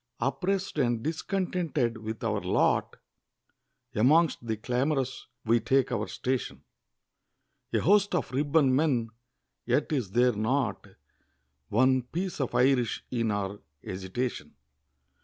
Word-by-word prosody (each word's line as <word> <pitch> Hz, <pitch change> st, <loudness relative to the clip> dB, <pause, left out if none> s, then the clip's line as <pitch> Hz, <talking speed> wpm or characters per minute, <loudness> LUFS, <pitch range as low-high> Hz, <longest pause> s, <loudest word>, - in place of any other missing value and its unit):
Oppress'd 180 Hz, +7 st, -1 dB
and 120 Hz, -4 st, +1 dB
discontented 160 Hz, -7 st, -1 dB
with 110 Hz, 0 st, -6 dB
our -, -, 0 dB
lot, -, -, +1 dB, 1.0 s
Amongst 140 Hz, +2 st, +3 dB
the 110 Hz, -1 st, -1 dB
clamorous 130 Hz, +3 st, -1 dB, 0.2 s
we 115 Hz, +1 st, +4 dB
take 130 Hz, +3 st, +1 dB
our 110 Hz, -2 st, -1 dB
station; 130 Hz, 0 st, -3 dB, 1.1 s
A -, -, +1 dB
host 200 Hz, +1 st, +3 dB
of 165 Hz, -, -1 dB
Ribbon 140 Hz, 0 st, +3 dB
Men 130 Hz, -6 st, +1 dB, 0.5 s
yet 130 Hz, +6 st, 0 dB
is 130 Hz, -10 st, -1 dB
there 120 Hz, +4 st, +3 dB
not 110 Hz, 0 st, -1 dB, 0.8 s
One 130 Hz, +4 st, +3 dB
piece 170 Hz, +7 st, -4 dB
of 130 Hz, -, -2 dB
Irish 125 Hz, -2 st, +2 dB
in 115 Hz, -3 st, 0 dB
our 100 Hz, -1 st, -2 dB, 0.3 s
agitation. 95 Hz, +7 st, -4 dB
130 Hz, 115 wpm, -28 LUFS, 115-150 Hz, 1.1 s, we